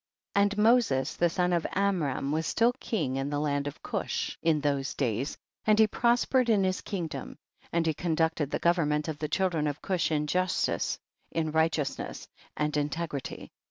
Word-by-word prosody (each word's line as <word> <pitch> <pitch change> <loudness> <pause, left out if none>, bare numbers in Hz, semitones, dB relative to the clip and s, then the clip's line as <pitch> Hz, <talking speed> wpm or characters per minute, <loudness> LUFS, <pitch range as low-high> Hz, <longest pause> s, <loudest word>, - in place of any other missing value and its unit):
1. 200 - +4
And 205 +1 +2
Moses 210 - +3
the 175 - +2
son 180 +1 +1
of 170 -2 +1
Amram 175 -9 0
was 160 +1 0
still 235 +1 +3
king 145 - -1
in 135 +1 -1
the 145 - -1
land 145 -1 0
of 145 - -7
Cush - - -2
in 160 -2 +3
those 140 -2 -1
days, 125 +1 -1 0.3
and 215 -1 +4
he 220 - +7
prospered 240 +3 +2
in 205 -3 +4
his 185 0 0
kingdom, 175 -6 -5 0.3
and 170 -1 +1
he 160 - +2
conducted 160 -2 0
the - - -1
government 155 -3 +1
of 155 -2 -4
the 150 - -3
children 165 -3 +1
of 145 0 -3
Cush 180 -4 0
in 150 -1 +1
justice, 180 +4 0 0.3
in 160 -1 -1
righteousness 160 -2 -1 0.3
and 150 0 0
in 145 0 +1
tegrity. 150 -4 -5
160 Hz, 180 wpm, -29 LUFS, 145-185 Hz, 0.3 s, he